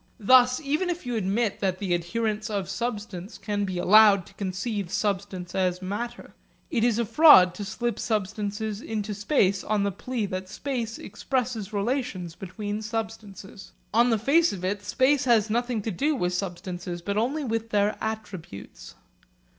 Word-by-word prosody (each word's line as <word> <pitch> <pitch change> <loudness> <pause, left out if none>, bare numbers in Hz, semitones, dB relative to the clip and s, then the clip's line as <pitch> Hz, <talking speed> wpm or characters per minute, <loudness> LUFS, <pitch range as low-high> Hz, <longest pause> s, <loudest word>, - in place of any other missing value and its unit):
Thus 250 +3 +5
even 310 +5 -1
if 350 -3 -3
you 245 -1 -2
admit 210 +1 0
that 190 -2 0
the 185 -2 -1
adherents 215 +5 -1
of 200 -4 -2
substance 210 -4 -5
can 205 0 -2
be 185 -2 -4
allowed 200 0 +6
to - - -17
conceive 195 0 -3
substance 190 -4 -2
as 185 -2 0
matter, 220 +6 -5 0.4
it 235 -7 +1
is 235 -2 +3
a 235 - +1
fraud 205 - +7
to 205 - -6
slip 235 +2 -3
substance 210 -1 -2 0.2
into 215 -2 -3
space 205 -2 +1
on 210 -1 0
the 200 - 0
plea 240 +3 -3
that 185 -1 -5
space 235 -4 -4
expresses 230 -1 -3
relations 205 -5 -2
between 205 +4 -5
substances. 215 -3 -6 0.2
On 235 +2 +4
the 225 - +3
face 305 +10 +3
of 185 -2 -5
it 200 +2 -1
space 260 +7 +2
has 225 -3 +3
nothing 240 -1 -1
to 225 - -2
do 290 - 0
with 180 -7 -1
substances, 180 -1 -5
but 200 +2 -2
only 260 +8 0
with 225 -2 -2
their 210 0 +2
attributes. 205 - -7
210 Hz, 160 wpm, -26 LUFS, 190-235 Hz, 0.4 s, fraud